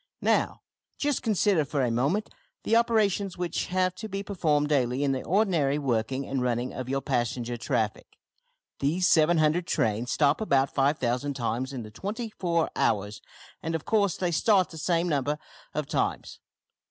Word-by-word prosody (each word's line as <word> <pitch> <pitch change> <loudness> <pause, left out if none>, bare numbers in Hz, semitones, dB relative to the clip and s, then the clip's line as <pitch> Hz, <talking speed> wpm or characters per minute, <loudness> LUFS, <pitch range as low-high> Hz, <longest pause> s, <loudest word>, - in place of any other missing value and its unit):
Now, - - +1 0.3
just 290 -2 0
consider 205 -6 +2
for 140 0 -1
a 120 - +1
moment 140 - 0 0.3
the 225 - +2
operations 210 -5 +2
which 175 -1 -2
have 185 0 +1
to 220 - -6
be 195 0 -4
performed 155 -7 +1
daily 130 -2 +1
in 140 - +2
the 130 -1 -1
ordinary 170 -8 +2
working 130 -1 -1
and 135 -1 -2
running 125 0 -1
of 130 -1 -5
your 135 +1 0
passenger 120 -2 -1
traffic. 110 -2 -2 0.6
These 170 +6 +1
700 160 +1 +3
trains 115 +3 0
stop 145 - +2
about 140 -10 +2
5000 135 -1 0
times 125 +1 -2
in 130 -4 -5
the 110 - -10
twenty 215 - -5
four 170 -5 0
hours, 105 -1 0 0.4
and 165 0 -2
of 160 - -4
course 200 -5 +2
they 180 -2 -1
start 185 +3 +3
the 160 - -8
same 170 +1 +1
number 145 -2 0 0.4
of - - -1
times. - - -2
150 Hz, 165 wpm, -27 LUFS, 130-185 Hz, 0.6 s, 700